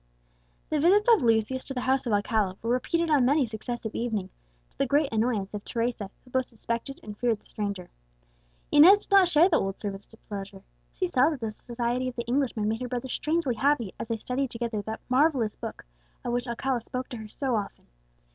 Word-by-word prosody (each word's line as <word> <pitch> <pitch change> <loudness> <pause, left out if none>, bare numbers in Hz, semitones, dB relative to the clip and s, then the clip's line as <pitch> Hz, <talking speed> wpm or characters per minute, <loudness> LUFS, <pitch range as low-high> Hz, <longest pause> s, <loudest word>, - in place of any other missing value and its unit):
The 305 - +2
visits 390 +8 +4
of 440 - +3
Lucius 230 +2 +2
to 270 - -6
the 250 - -1
house 260 0 +1
of - - 0
Alcala 205 -2 +1
were 230 - 0
repeated 330 +7 0
on 285 -4 +5
many 280 +2 +3
successive 225 0 -5
evenings, 215 -6 -2 0.4
to - - -35
the 275 - +2
great 285 -1 +2
annoyance 220 -3 0
of 210 -1 -5
Teresa, 230 -4 -2 0.2
who 250 - -18
both 260 0 +1
suspected 235 +3 -4
and 210 -1 -8
feared 230 -1 0
the - - -32
stranger. 200 -4 -4 0.8
Inez 340 +8 +9
did 410 - -18
not 390 -2 +7
share 340 0 +5
the 335 -5 +3
old 195 0 -3
servant's 200 -1 -5
displeasure. 200 -3 -9 0.3
She 370 - -1
saw 275 -3 +4
that 300 -4 -4
the 220 -1 -2
society 240 +3 -2
of 255 - -5
the 235 - -3
Englishman 240 -4 0
made 225 +2 -1
her 250 - -2
brother 250 +1 -4
strangely 305 -1 0
happy, 240 -3 +1
as - - -4
they 230 -1 -1
studied 255 +4 -2
together 230 -3 -3
that 220 +2 -6
marvellous 255 -4 +2
Book, - - -7 0.4
of 240 - -1
which 245 +1 -1
Alcala 240 +1 -1
spoke 255 +3 -5
to 245 - -6
her 220 -1 -8
so 255 +3 -2
often. 205 -2 -4
240 Hz, 210 wpm, -27 LUFS, 220-270 Hz, 0.8 s, Inez